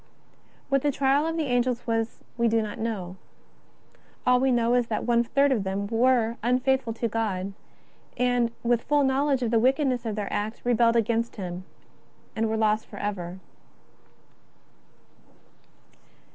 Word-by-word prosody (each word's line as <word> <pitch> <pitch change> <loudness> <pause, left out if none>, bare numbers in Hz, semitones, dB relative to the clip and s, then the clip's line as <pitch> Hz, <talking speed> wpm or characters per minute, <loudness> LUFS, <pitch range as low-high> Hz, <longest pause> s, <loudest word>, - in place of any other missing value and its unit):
^Vhat 275 -1 +3
the 290 - +1
trial 275 +3 +2
of 325 0 -2
the 320 - 0
Angels 245 -2 0
was 225 -1 -2
we 235 0 +2
do 230 0 +2
not 210 -1 -6
know. 195 -5 -4 1.1
All 250 -1 +4
we 265 +1 +2
know 235 -1 +2
is 245 -1 +2
that 215 - -2
one 235 0 +3
third 280 +4 +2
of 225 -7 +1
them 195 +1 -2
were 230 +1 +2
unfaithful 250 +1 +1
to 230 +1 -2
God, 200 -4 -2 0.6
and, 245 -1 +2
with 235 -1 +2
full 290 +2 +2
knowledge 270 0 +1
of 230 - -1
the 230 - +4
wickedness 260 0 +1
of 215 - -2
their 205 -2 -4
act, 215 +2 -3
rebelled 235 -1 +3
against 230 +1 0
Him 185 -2 -6 0.7
and 225 0 0
were 220 - -1
lost 215 0 +1
forever. 185 -3 -5
235 Hz, 150 wpm, -26 LUFS, 220-255 Hz, 1.1 s, All